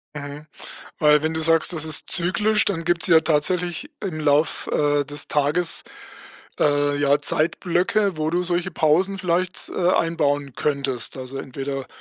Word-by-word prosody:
Mhm, 145 +1 -8 0.5
weil 150 0 +4
wenn 160 - -1
du 160 - -2
sagst, 165 +2 +2
das 160 -1 -2
ist 155 -1 +2
zyklisch, 195 +5 +2
dann 165 -5 -1
gibt's 175 -1 +1
ja 165 -3 +6
tatsächlich 175 - -1
im 180 -6 -4
Lauf, 150 +1 +1
äh, 145 -1 +1
des 145 +1 -5
Tages, 150 +4 0 0.8
äh, 145 -1 +2
ja, 145 0 +3
Zeitblöcke, 180 +5 +1
wo 155 0 -1
du 175 +2 0
solche 175 +1 -1
Pausen 170 +6 +1
vielleicht, 180 0 -1
äh, 180 -1 0
einbauen 145 -5 0
könntest. 140 -4 -2
Also, 130 +1 -7
entweder 135 0 -5
155 Hz, 150 wpm, -22 LUFS, 145-175 Hz, 0.8 s, ja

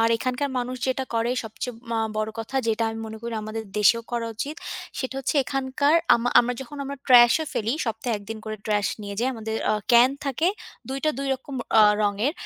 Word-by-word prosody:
আর 225 - +4
এখানকার 255 +4 -1
মানুষ 250 +1 -3
যেটা 260 0 0
করে 230 +1 +1
সবচেয়ে 225 +3 -5 0.2
ম - - -1 0.2
বড় 215 0 -1
কথা 225 +4 -4
যেটা 225 0 +1
আমি 225 - -6
মনে 220 0 -8
করি 235 0 -4
আমাদের 215 +1 -5 0.2
দেশেও 230 +3 +4
করা 235 -1 -1
উচিত। 280 +8 -4 0.4
সেটা 260 0 -3
হচ্ছে 270 - -1
এখানকার 270 +3 +1 0.2
আম 235 - 0 0.2
আমরা 245 +1 -1
যখন 265 +3 -8
আমরা 280 +1 -5
trash 240 -2 +8
এ - - -3
ফেলি, 220 +2 0
সপ্তাহে 225 +1 -2
১ - - -14
দিন 225 - -4
করে 215 0 -4
trash 210 -1 +1
নিয়ে 200 -1 -5
যায়। 255 +2 +1
আমাদের 220 -1 -4
আ - - +3 0.2
ক্যান 240 +2 +7
থাকে 280 +5 +1 0.4
২ 265 +1 -3
টা 310 - +4
২ 275 - -2
রকম 265 +1 -9 0.3
আ - - +9 0.2
রঙের, 210 +7 +1
235 Hz, 210 wpm, -25 LUFS, 220-265 Hz, 0.4 s, আ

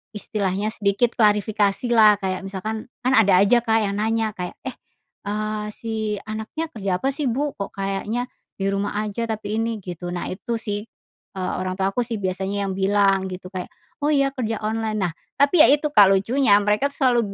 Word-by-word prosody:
istilahnya 205 -1 -2
sedikit 210 +2 +1
klarifikasilah. 210 +1 +4
Kayak 185 -1 -1
misalkan 215 +3 -5 0.2
kan 255 +1 +2
ada 200 -4 +5
aja, 205 +5 +5
Kak, 225 -1 +3
yang 200 - -3
nanya 225 0 0
kayak, 180 -1 -4
"Eh," 260 - -3 0.6
eee, 215 +1 -2
"si 225 -1 -5 0.4
anaknya 220 +10 -4
kerja 195 - -2
apa 270 - +1
sih, 290 +1 -3
Bu? 280 +5 0
Kok 200 -2 -5
kayaknya 195 +4 -2 0.3
di 195 0 -1
rumah 200 +1 -2
aja 215 +2 -3
tapi 215 -1 -3
ini?" 230 0 -1
gitu. 175 -1 -6
Nah, 175 - -4
itu 230 +5 -4
sih, 205 -1 -4 0.5
eee, 185 -1 -2
orang 185 0 -2
tua 190 0 0
aku 220 - -3
sih 230 -1 -4
biasanya 190 +2 -2
yang - - -2
bilang 195 -1 +3
gitu 185 0 -8
kayak, 185 -2 -5 0.3
"Oh, 290 - 0
ya 275 -2 +3
kerja 235 -5 -2
online." 215 -1 -1
Nah, 175 - 0 0.2
tapi 285 +4 +3
ya 310 - +9
itu, 295 +1 +3
Kak, 205 -9 +7
lucunya 200 +5 +3
mereka 210 +6 +2
tuh 280 - -14
selalu 245 -2 +4
210 Hz, 185 wpm, -23 LUFS, 195-230 Hz, 0.6 s, ya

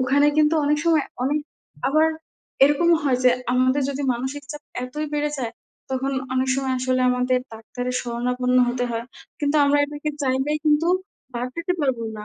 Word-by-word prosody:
ওখানে 275 +3 +3
কিন্তু 305 +1 +4
অনেক 295 +1 +2
সময় 320 -4 +3 0.2
অনেক 290 +3 +1 0.5
আবার 310 +3 +4 0.6
এরকমও 330 +4 +4
হয় 260 -3 +2
যে, 250 - +7 0.2
আমাদের 255 +2 +2
যদি 280 +1 -4
মানসিক 265 +4 -4
চাপ 295 0 -9 0.2
এতই 300 +5 -4
বেড়ে 295 0 0
যায়। 235 -3 -3 0.4
তখন 265 +1 -1 0.2
অনেক 260 0 +1
সময় 265 -1 -1
আসলে 255 0 0
আমাদের 250 0 +1
ডাক্তারের 245 +3 -5
শরণাপন্ন 250 +1 0
হতে 245 0 -1
হয়। 230 0 -3 0.4
কিন্তু 290 +1 +1
আমরা 285 +1 +3
এটাকে 295 +1 -4
চাইলেই 265 +3 0
কিন্তু 305 +2 +3 0.5
বাদ 245 +1 -2
দিতে 335 +2 -1
পারব 265 -5 +1 0.2
না। 210 - -7
265 Hz, 165 wpm, -23 LUFS, 250-295 Hz, 0.6 s, যে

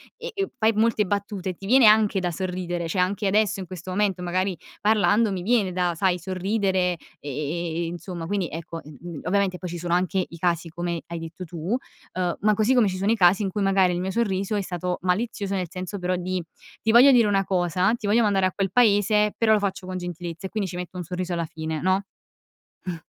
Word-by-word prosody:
e 485 0 -7
e 390 0 -1
fai 220 +1 +3
molte 220 0 +2
battute, 200 -2 -3
ti 195 - -11
viene 245 +2 +6
anche 215 -2 +5
da 180 -1 -1
sorridere, 175 -1 -3
cioè 180 +3 0
anche 195 +3 0
adesso 205 0 +2
in 190 - -5
questo 185 0 -9
momento 195 -1 0
magari 185 +2 -1 0.3
parlando 210 +1 +3
mi 190 -2 -3
viene 205 -1 +2
da, 180 -1 0
sai, 180 +1 +1
sorridere, 185 0 0 0.2
e 145 - -7 0.2
e, 170 +1 -2
insomma, 170 0 -6
quindi, 195 -1 -1
ecco, 165 +1 -6
mhmm, 150 +2 -9
ovviamente 190 0 +1
poi 180 0 -6
ci 175 - -5
sono 170 0 -2
anche 185 +1 +1
i 170 - -11
casi 170 0 0
come 170 0 -3
hai 170 - -5
detto 165 +3 -7
tu, 170 +6 -3 0.4
ehm, 180 -1 -1
ma 210 +1 +4
così 215 +5 +2
come 240 -4 +5
ci 185 -1 -2
sono 190 - -2
i - - +4
casi 190 0 +4
in 195 - 0
cui 205 - -2
magari 195 -2 +3
il 175 - -2
mio 190 +1 -2
sorriso 200 -2 0
è 205 - +1
stato 180 -1 -3
malizioso, 200 +2 -1
nel 185 -2 -2
senso 185 +3 -5
però 180 0 0
di: 180 0 -2 0.4
“Ti 225 - +2
voglio 250 +5 +8
dire 240 -4 +5
una 195 -1 +2
cosa, 180 +2 +1
ti 235 - -8
voglio 220 +4 +4
mandare 195 -3 +2
a - - -3
quel 195 -2 -1
paese”, 210 -1 +3
però 220 -1 +4
lo 215 - +4
faccio 195 -2 -3
con 185 0 -4
gentilezza 175 0 -6
e - - -15
quindi 200 -2 -2
ci 175 - -7
metto 180 +1 -6
un 180 - -3
sorriso 180 +2 -4
alla 170 -1 -1
fine, 160 0 -5
no? 190 +2 +2 0.8
Mh. 180 - -3
185 Hz, 225 wpm, -24 LUFS, 175-205 Hz, 0.8 s, voglio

